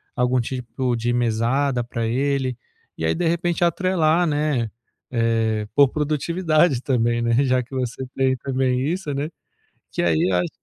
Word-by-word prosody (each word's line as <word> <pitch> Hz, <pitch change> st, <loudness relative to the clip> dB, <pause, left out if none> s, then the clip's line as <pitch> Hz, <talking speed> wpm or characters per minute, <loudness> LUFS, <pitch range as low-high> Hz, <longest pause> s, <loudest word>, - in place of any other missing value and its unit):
algum 125 Hz, +1 st, +2 dB
tipo 125 Hz, 0 st, -2 dB
de 120 Hz, +1 st, -1 dB
mesada 120 Hz, +2 st, +1 dB
pra 115 Hz, -1 st, -3 dB
ele 130 Hz, +1 st, 0 dB, 0.4 s
e -, -, -6 dB
aí, -, -, +1 dB
de 170 Hz, 0 st, 0 dB
repente, 170 Hz, +1 st, 0 dB
atrelar, 175 Hz, -1 st, +2 dB
né, 145 Hz, -6 st, 0 dB, 0.4 s
eh, 115 Hz, -2 st, +1 dB
por 140 Hz, 0 st, +6 dB
produtividade 155 Hz, 0 st, +1 dB
também, 120 Hz, -2 st, +1 dB
né? 115 Hz, +4 st, +3 dB
Já 130 Hz, -1 st, +2 dB
que 125 Hz, -, -17 dB
você 130 Hz, 0 st, -3 dB
tem 130 Hz, -1 st, +2 dB
também 130 Hz, -1 st, 0 dB
isso, 175 Hz, -3 st, -2 dB
né? 145 Hz, +3 st, -2 dB, 0.6 s
Que -, -, -2 dB
aí 80 Hz, -2 st, +2 dB
eu -, -, +2 dB
acho 90 Hz, -1 st, +1 dB
130 Hz, 160 wpm, -22 LUFS, 120-150 Hz, 0.6 s, por